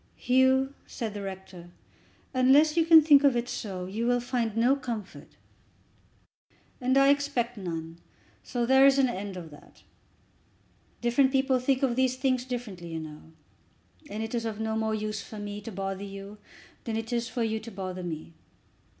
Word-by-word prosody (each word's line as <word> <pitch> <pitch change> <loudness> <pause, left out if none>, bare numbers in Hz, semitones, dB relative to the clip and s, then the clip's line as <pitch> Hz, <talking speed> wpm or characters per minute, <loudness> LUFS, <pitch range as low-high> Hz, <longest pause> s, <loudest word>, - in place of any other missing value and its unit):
"Hugh," 260 +1 +3
said 225 -5 -5
the 205 - -6
rector, 190 -2 -8 0.6
"unless 275 +5 +5
you 330 -1 +2
can 325 -2 +9
think 290 -2 +6
of 275 -3 +4
it 240 0 -2
so, 190 -7 -5
you 215 +6 -3
will 245 0 +3
find 235 -3 -2
no 245 +4 +4
comfort." 230 -7 -6 1.5
"And 260 +2 +2
I 275 0 +6
expect 280 -4 +1
none, 165 -4 -6 0.4
so 240 -1 -2
there 265 +2 +6
is 275 0 +4
an 270 -1 +4
end 195 -3 -5
of 165 -3 -9
that. 145 - -17 1.2
Different 240 +3 +3
people 265 -1 +2
think 265 +2 0
of 250 -3 +2
these 260 0 +2
things 255 -1 0
differently, 230 -9 -6
you 160 - -3
know, 155 -1 -9 0.9
and 215 +2 -4
it 225 - -6
is 235 -1 -1
of 220 -2 -4
no 220 0 -2
more 220 0 0
use 215 -1 -3
for 215 - -10
me 205 0 -6
to 225 - -8
bother 195 0 -4
you 200 +1 -9 0.5
than 225 -1 -2
it 225 +1 -4
is 235 0 -1
for 240 - -2
you 220 -1 -1
to 225 - -9
bother 185 -3 -6
me. 165 -1 -6
230 Hz, 175 wpm, -28 LUFS, 200-260 Hz, 1.5 s, can